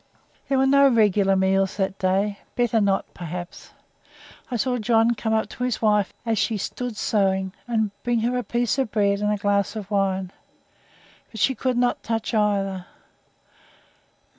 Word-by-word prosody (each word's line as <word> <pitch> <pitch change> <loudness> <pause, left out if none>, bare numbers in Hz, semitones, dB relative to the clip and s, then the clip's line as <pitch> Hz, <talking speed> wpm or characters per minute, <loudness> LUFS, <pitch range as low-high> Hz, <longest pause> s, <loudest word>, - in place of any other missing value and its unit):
There 270 - +2
were 265 - +3
no 280 +1 +5
regular 205 -5 +3
meals 190 0 +1
that 190 -1 -2
day; 195 +2 0 0.2
better 235 -2 +2
not, 195 -1 0
perhaps. 175 +1 -7 0.8
I 250 - -3
saw 250 +2 0
John 225 +1 +3
come 225 -1 -3
up 220 0 +1
to 250 - -6
his 250 -2 -1
wife 210 -3 +2
as 225 -3 0
she 225 - 0
stood 235 +3 -5
sewing, 190 -3 0
and 220 -3 0
bring 240 -2 0
her 240 +2 0
a 250 - -1
piece 240 +2 -1
of 260 -4 0
bread 200 -1 +1
and 210 0 0
a 210 - 0
glass 200 +1 0
of 210 -2 -7
wine 190 -2 0 1.0
but 220 - -9
she 265 - +3
could 255 -1 -1
not 245 0 +1
touch 225 0 -3
either. 195 -4 0
210 Hz, 165 wpm, -23 LUFS, 195-235 Hz, 1.0 s, no